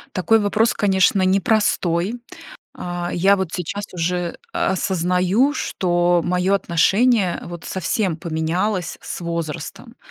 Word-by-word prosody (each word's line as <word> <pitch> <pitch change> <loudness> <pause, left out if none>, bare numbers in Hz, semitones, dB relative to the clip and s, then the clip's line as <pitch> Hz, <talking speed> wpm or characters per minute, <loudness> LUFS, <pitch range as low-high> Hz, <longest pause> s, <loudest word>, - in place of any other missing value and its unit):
Такой 215 +5 +3
вопрос, 220 +3 +1
конечно, 190 -1 +2
непростой. 195 +1 +1 0.6
А, 175 0 -4
я 195 +3 +4
вот 190 -3 -3
сейчас 195 +3 -4
уже, 180 0 -1
э, - - -14 0.2
осознаю, 185 - +1
что 175 - +1
мое 180 +2 +1
отношение 195 +2 +2
вот 175 -1 -9
совсем 190 -1 -1
поменялось 170 +3 -2
с - - -6
возрастом. 170 -3 -5
185 Hz, 115 wpm, -21 LUFS, 175-200 Hz, 0.6 s, я